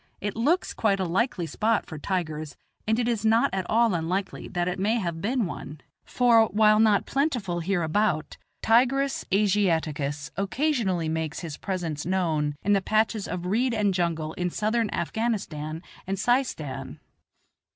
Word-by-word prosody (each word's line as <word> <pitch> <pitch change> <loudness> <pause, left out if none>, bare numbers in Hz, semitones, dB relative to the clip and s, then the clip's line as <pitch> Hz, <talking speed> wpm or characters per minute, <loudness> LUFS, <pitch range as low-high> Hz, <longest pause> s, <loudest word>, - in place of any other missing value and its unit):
It 205 0 -3
looks 295 +11 +1
quite 200 -3 +1
a - - +1
likely 185 +1 0
spot 220 +6 0
for 155 - -8
tigers, 155 -4 -3 0.3
and 220 +1 +2
it 240 -1 0
is 230 -3 0
not 225 +1 +3
at 190 -2 -2
all 230 -1 +3
unlikely 180 +4 -2
that 175 0 -2
it 180 +1 -2
may 210 +4 +2
have 170 -6 -3
been 240 +2 0
one, 155 -3 -7 0.3
for, 235 -3 +4
while 215 +1 +4
not 215 -2 +4
plentiful 245 - -1
hereabout, 170 -1 0 0.3
Tigris 265 +4 +2
Asiaticus 160 -8 +1
occasionally 200 - 0
makes 160 -1 -2
his 160 -4 -6
presence 170 -6 -3
known 160 -5 0
in 205 - +3
the 195 - +3
patches 215 +1 +1
of 180 -1 -4
reed 230 +6 +1
and 205 -3 +2
jungle 165 -3 -1
in 180 +1 -2
Southern 220 +3 0
Afghanistan 170 -6 -3 0.2
and 195 +1 -1
Seistan. 215 - -1
195 Hz, 150 wpm, -26 LUFS, 165-225 Hz, 0.3 s, for